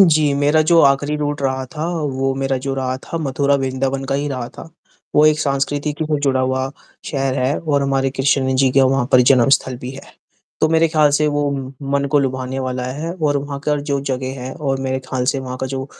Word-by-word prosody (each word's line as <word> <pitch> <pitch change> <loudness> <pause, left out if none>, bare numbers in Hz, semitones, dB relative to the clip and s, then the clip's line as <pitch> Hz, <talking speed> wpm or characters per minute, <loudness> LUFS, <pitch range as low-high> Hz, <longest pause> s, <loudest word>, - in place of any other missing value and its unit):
जी, 155 -5 +5
मेरा 145 +2 +3
जो 170 -1 +6
आख़िरी 140 +1 +3
रूट 145 -1 -2
रहा 130 -1 -1
था, 155 0 -3
वो 135 -6 -1
मेरा 135 0 -1
जो 135 +1 -3
रहा 130 -1 -2
था 165 - -4
मथुरा 140 -1 +1
वृंदावन 135 0 -1
का 135 0 -2
ही 145 +1 -1
रहा 130 -4 -4
था। - - -12 0.5
वो 150 - +6
एक 155 0 +3
सांस्कृतिकी 145 +1 -1
से 150 -1 0
जुड़ा 135 -2 +1
हुआ 130 +1 -1 0.3
शहर 135 -2 -1
है 130 +3 0
और 145 -3 0
हमारे 135 -1 +1
कृष्ण 135 0 +1
जी 135 0 +3
का 135 - +6
वहाँ 130 -1 +2
पर 130 - +7
जन्मस्थल 130 0 +3
भी 125 +1 -6
है। 135 +1 -11 0.5
तो 155 - +4
मेरे 165 0 +4
ख़्याल 155 -2 +3
से 150 +1 +2
वो 145 -1 0 0.4
मन 140 0 +1
को 145 - +4
लुभाने 130 -1 -2
वाला 130 -1 -3
है 160 +5 -4
और 150 -5 0
वहाँ 140 0 -5
का 150 - +2
जो 140 -1 -2
जगह 130 -1 -3
है 130 +1 -5
और 135 -4 -2
मेरे 130 0 -1
ख़्याल 130 -1 -3
से 135 - -2
वहाँ 130 -1 -6
का 130 - -1
जो 135 0 -4
135 Hz, 220 wpm, -19 LUFS, 130-145 Hz, 0.5 s, पर